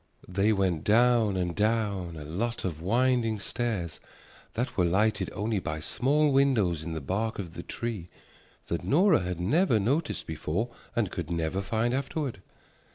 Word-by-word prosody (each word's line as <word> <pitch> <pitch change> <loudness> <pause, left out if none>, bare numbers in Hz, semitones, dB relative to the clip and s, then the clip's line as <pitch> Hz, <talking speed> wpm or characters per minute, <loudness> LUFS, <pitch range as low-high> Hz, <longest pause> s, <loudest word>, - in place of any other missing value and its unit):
They 100 +4 +2
went 95 -6 +1
down 115 -2 +4
and 90 -2 -1
down 105 -6 0
a 75 - -7
lot 105 +11 -2
of 80 -4 -3
winding 115 +2 +2
stairs 100 -8 -2 0.5
that 120 +3 -2
were 90 - +2
lighted 100 +6 +2
only 105 0 -1
by 80 -3 -4
small 145 - +2
windows 120 - +3
in 80 +1 -5
the 80 - -4
bark 110 - -2
of 90 -5 -6
the - - -6
tree 110 -7 -4 0.6
that 85 - -3
Nora 175 +4 +4
had 90 -1 -3
never 120 - +3
noticed 140 +10 0
before 80 +8 -2 0.3
and 110 -6 +1
could 85 -3 -4
never 85 +2 -1
find 110 +4 0
afterward. 135 - -2
105 Hz, 160 wpm, -28 LUFS, 90-120 Hz, 0.6 s, down